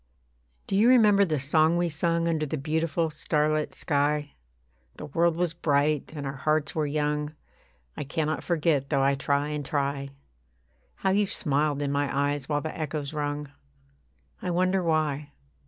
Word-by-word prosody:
Do - - -2
you 215 +5 +5
remember 210 -5 +6
the 155 -5 -1
song 155 +5 +3
we 175 0 +1
sung, 170 +1 0
Under 155 -2 0
the 155 - -3
beautiful 160 +2 -1
starlit 155 0 0
sky? 145 0 0 0.6
The - - -8
world 165 +3 +1
was 175 -1 0
bright, 150 -2 +1
and 145 -1 -5
our 135 0 -4
hearts 155 +2 0
were 155 -2 0
young 150 +1 -1 0.6
I - - -4
cannot 155 +2 -2
forget 155 -5 +1
though 140 -3 +2
I 140 +1 +3
try 140 +1 0
and 150 -1 -3
try. 140 -1 -2 0.9
How 190 - 0
you 205 +1 +2
smiled 145 -4 0
in 140 - -1
my 145 0 +1
eyes 145 -1 -5
while 145 -1 +1
the 155 - -5
echoes 150 -2 -4
rung. 145 -1 -3 0.9
I - - -3
wonder 185 +2 +2
why. 150 -3 -1
150 Hz, 160 wpm, -27 LUFS, 145-165 Hz, 0.9 s, remember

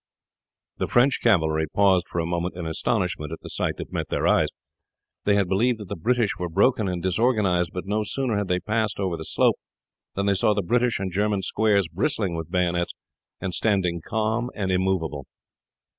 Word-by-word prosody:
The - - 0
French 125 +3 +3
cavalry 80 -8 +2
paused 95 -3 +3
for - - -6
a 85 - +1
moment 85 +1 -2
in 85 - -4
astonishment 80 -2 -1
at 80 - -4
the - - -9
sight - - -1
that - - -8
met - - -3
their - - -1
eyes. - - +4 0.8
They 100 - +4
had 100 -2 +2
believed 115 +6 +2
that 105 -4 -9
the 100 - -3
British 120 +4 0
were 90 -1 -2
broken 105 +5 +2
and 90 -2 -3
disorganized, 95 -3 +2
but 90 - -5
no 105 +2 0
sooner 120 +2 -1
had 100 -1 -1
they 90 0 +1
passed 110 +2 -1
over 95 -3 -1
the 80 - -6
slope - - +2 0.6
than 100 - -1
they 100 - +3
saw 105 +2 +2
the 100 - 0
British 120 +5 +1
and 95 -1 -3
German 100 +1 0
squares 100 -2 +2
bristling 85 +3 -1
with 80 0 -5
bayonets 85 -1 0 0.5
and 95 -1 -3
standing 90 -6 +1
calm 110 +4 -1
and 95 -3 -1
immovable. 90 -6 -1
95 Hz, 190 wpm, -24 LUFS, 90-110 Hz, 0.8 s, eyes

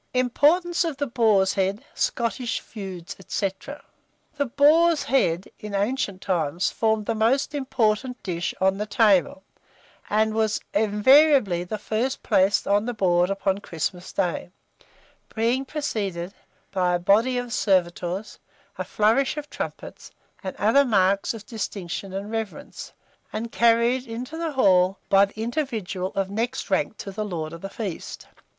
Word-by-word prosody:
IMPORTANCE 310 +8 +3
OF 325 -5 -3
THE 285 - -1
BOAR'S 220 -6 +3
HEAD, 195 +2 -1
SCOTTISH 235 +1 -1
FEUDS, 190 -5 -8
&c. 195 -2 0 0.8
The 285 -2 -1
boar's 305 +5 +4
head, 190 -8 +1
in 210 -1 -6
ancient 200 -2 -1
times, 175 -2 0
formed 220 -1 0
the 230 - 0
most 235 +7 +1
important 250 -3 -1
dish 170 -2 -3
on 190 +1 +2
the 210 - -2
table, 200 -4 +3 0.7
and 215 +1 +2
was 220 -1 +1
invariably 215 - +4
the 195 +4 -4
first 225 +6 -2
placed 190 +2 +2
on 205 +2 +2
the 245 - -3
board 180 -3 +2
upon 195 0 0
Christmas 175 0 -4
day, 175 0 -2 0.9
being 235 +4 +1
preceded 200 - -3 0.4
by 180 -2 +1
a - - +2
body 220 +8 +3
of 245 -1 -3
servitors, 185 -1 0 0.4
a - - 0
flourish 230 +8 +1
of 295 0 -6
trumpets, - - -7 0.3
and 190 - -5
other 225 +7 +4
marks 200 -3 +2
of 215 -1 -10
distinction 195 -4 -5
and 200 +3 -5
reverence, 225 -2 -6 0.4
and 225 +2 -4
carried 235 +2 +3
into 245 +6 -6
the 325 -2 -3
hall 190 -6 +4
by 195 0 +6
the 200 +2 -14
individual 225 - -3
of 195 0 -1
next 235 +3 -3
rank 195 +2 0
to 195 - -7
the 215 +2 -3
lord 165 -6 -4
of 165 - -9
the 195 - -6
feast. 200 -5 -6
215 Hz, 145 wpm, -24 LUFS, 190-245 Hz, 0.9 s, by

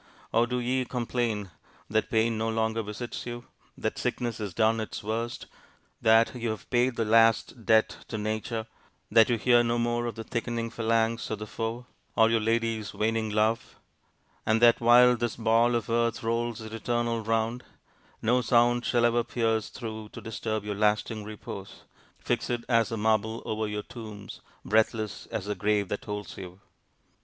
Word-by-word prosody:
Or 115 +1 +4
do 125 +1 -1
ye 125 +1 0
complain 120 -5 -2 0.4
that 110 +2 0
pain 115 0 +2
no 110 +1 -1
longer 110 0 0
visits 110 +4 -6
you, 120 0 -6 0.3
that - - -3
sickness 120 -3 -2
has 105 -3 -4
done 110 +5 +2
its 110 - -5
worst, 115 +3 -3 0.6
that 115 0 +5
you 120 -2 -3
have 110 -1 -5
paid 125 0 +2
the 115 - 0
last 115 +1 +3
debt 110 -1 +4
to 110 - -4
nature, 110 +1 -3 0.5
that 115 0 +6
you 120 - +2
hear 120 +1 +4
no 120 0 0
more 120 0 0
of 120 - -4
the 115 - -6
thickening 115 0 -3
phalanx 115 0 0
of 110 - -2
the 105 - -6
foe, 115 +3 -4 0.3
or 110 0 +5
your 115 - +3
lady's 115 -1 -1
waning 110 0 0
love; 110 +2 0 0.7
and 110 +1 +2
that 120 0 +5
while 125 +1 +7
this 120 -1 -2
ball 115 +1 +3
of 115 -2 -1
earth 115 0 0
rolls 115 0 -1
its 110 0 -8
eternal 115 0 -1
round, 115 +2 0 0.6
no 125 +3 +3
sound 120 0 +3
shall 120 -1 +2
ever 120 0 +3
pierce 115 -3 0
through 110 -3 -7
to - - -7
disturb 110 -1 -4
your 105 - -2
lasting 105 +1 0
repose, 105 0 -9 0.3
fixed 115 - -2 0.2
as 115 -2 +3
the 115 - -3
marble 110 +1 0
over 110 0 -2
your 105 0 -3
tombs, 110 -4 -9 0.2
breathless 110 -1 0
as - - -4
the 105 - -1
grave 105 0 0
that 105 - -4
holds 105 0 -6
you! 90 0 -9
115 Hz, 170 wpm, -28 LUFS, 110-120 Hz, 0.7 s, while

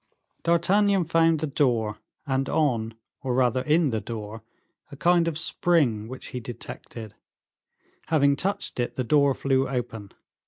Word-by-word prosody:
D'Artagnan 190 +3 +3
found 165 -1 +2
the - - +1
door, 120 -7 0 0.3
and 135 -1 -1
on, 115 -7 0 0.3
or 130 -2 -1
rather 125 -1 +2
in 155 0 +2
the 110 -1 -1
door, 110 -1 -7 0.5
a 140 - -10
kind 170 +3 +3
of 160 -2 -2
spring 145 -10 +1
which 130 +2 -9
he 125 - -5
detected; 115 -2 -9 0.9
having 140 -3 +3
touched 195 -5 -2
it, 120 - -2
the 130 - -1
door 140 +1 +3
flew 135 -1 +1
open. 115 -6 -4
135 Hz, 145 wpm, -25 LUFS, 120-160 Hz, 0.9 s, D'Artagnan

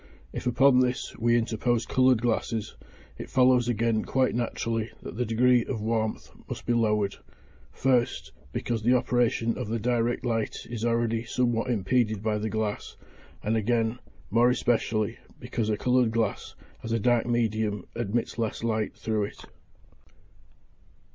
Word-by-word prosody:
If - - -4
upon 130 +2 +5
this 125 0 -1
we 120 +1 +3
interpose 115 0 0
coloured 130 -2 +3
glasses, 115 -2 -1 0.4
it - - -7
follows 125 -2 +4
again 115 -1 +1
quite 130 -1 +1
naturally 115 -1 -2
that - - -7
the 125 +1 -1
degree 120 +2 +4
of 120 -2 -4
warmth 110 0 -2 0.2
must - - -6
be 120 - +1
lowered; 105 -3 +1 0.5
first, 125 -2 0 0.2
because 115 - -2
the 120 +3 +4
operation 120 -2 +1
of 125 - -3
the 115 +2 -1
direct 120 +2 0
light 115 -2 -2
is 115 -2 -5
already 115 -1 +1
somewhat 120 0 0
impeded 110 -1 +1
by 105 -1 0
the 110 +1 -2
glass, 110 -1 -3 0.5
and 110 +2 0
again, 115 +1 0 0.3
more 120 +3 +5
especially, 115 -3 0 0.2
because 110 -2 -2
a 105 - +1
coloured 125 0 +2
glass, 115 -2 -2 0.3
as 115 - -6
a 115 - +1
dark 120 +2 +2
medium, 110 -4 0
admits 120 +1 -2
less 115 0 -2
light 110 -2 -1
through 110 -2 -1
it. - - -11
115 Hz, 150 wpm, -27 LUFS, 110-120 Hz, 0.5 s, upon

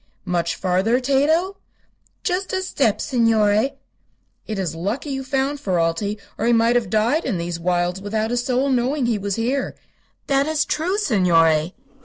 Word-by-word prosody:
"Much 170 -2 -1
farther, 190 +7 +1
Tato?" 310 +9 +1 0.7
"Just 370 +2 -2
a 375 0 0
step, 265 - +1
signore." 225 +1 +2 0.7
"It 215 - -3
is 185 -5 -2
lucky 205 - -3
you 270 0 -3
found 270 +1 -1
Ferralti, 185 +1 -1 0.2
or - - 0
he 240 - +4
might 230 +1 +3
have 240 -2 +1
died 230 +9 +1
in 185 - -1
these 170 0 -4
wilds 175 +1 0
without 215 +2 -2
a 245 - 0
soul 255 +3 0
knowing 260 +2 +1
he 230 -3 0
was 200 -1 -2
here." 250 +5 -1 0.5
"That 275 +1 +1
is 310 -1 +1
true, 355 +6 -1
signore." 170 - +2
230 Hz, 160 wpm, -21 LUFS, 185-275 Hz, 0.7 s, he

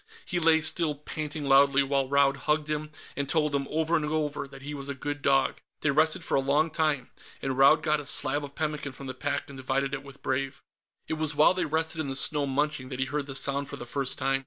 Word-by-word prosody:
He 175 - -1
lay 160 -1 +4
still, 160 -1 +1
panting 150 0 -5
proudly, 140 0 +5
while 135 -1 0
Raud 140 0 +3
hugged 150 +2 0
him 150 0 -3 0.3
and 140 -1 -3
told 150 0 +1
him, 140 -1 -1
over 160 +2 +1
and 155 - +1
over, 150 -2 -2
that 135 0 -13
he 150 +2 -5
was 140 -1 -5
a 140 - -3
good 145 +2 -4
dog. 135 -1 +2 0.2
They 150 - +2
rested 155 +2 +2
for - - -4
a - - +4
long 145 +4 +1
time, 150 -6 0 0.3
and 135 -1 -2
Raud 140 +4 +5
got 155 -1 +2
a 145 - -6
slab 145 +1 +2
of 140 -1 -9
pemmican 150 -3 -3
from 135 - -10
the 130 - -5
pack 145 +2 -2
and 140 -2 -10
divided 135 +2 -1
it 140 - -3
with 140 0 -14
Brave. 135 +1 -2 0.4
It 160 - -3
was 155 -2 -1
while 150 +4 +5
they 185 - -1
rested 160 +1 0
in 150 - -3
the 135 - -2
snow, 145 +1 +3
munching, 140 -1 -1
that 130 -1 -6
he 135 - +1
heard 145 +1 -3
the 135 - -6
sound 140 +1 +1
for - - -6
the - - -8
first 135 +2 -2
time. 135 0 +1
145 Hz, 250 wpm, -27 LUFS, 135-155 Hz, 0.4 s, proudly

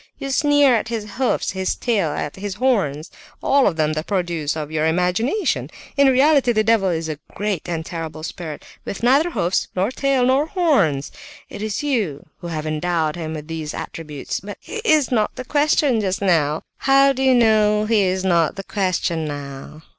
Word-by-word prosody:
You 275 - -5
sneer 290 -1 +4
at 220 - -1
his 230 -2 -3
hoofs, 260 -1 0
at - - -11
his 190 -1 -1
tail, 210 -9 0
at 150 0 -4
his 195 0 -5
horns—all 215 - 0
of 175 - 0
them 155 -1 +1
the 155 0 -2
produce 170 -6 -2
of 155 -1 -5
your 155 0 +1
imagination! 180 - 0 0.3
In 280 -1 +5
reality 270 0 +4
the 215 -1 +2
devil 215 -3 +3
is 165 -2 -2
a 155 -2 -5 0.2
great 200 -5 -2
and 165 -2 -3
terrible 165 -2 -6
spirit, 160 -1 -7 0.2
with 200 - -6
neither 275 +8 +4
hoofs, 180 - 0
nor 190 +5 0
tail, 270 -1 +1
nor 270 +4 +2
horns; 200 - +1 0.4
it - - -8
is 215 +4 -3
you 210 - -1
who 175 - -7
have 155 -2 -4
endowed 155 0 -1
him 160 -2 -5
with 150 -1 -8
these 160 -2 -5
attributes! 150 -4 -5
But... 205 +2 -8
he 450 - -8
is 310 - +2
not 220 -4 +1
the 255 - -6
question 290 -4 +2
just 190 -2 -1
now!" 160 -6 +1
"How 275 0 +4
do 265 - -4
you 260 -1 +4
know 215 -2 +3
he 220 -1 +3
is 185 0 0
not 170 -3 +2
the 195 - -6
question 185 -5 -1
now?" 145 +1 -7
195 Hz, 190 wpm, -21 LUFS, 160-255 Hz, 0.4 s, In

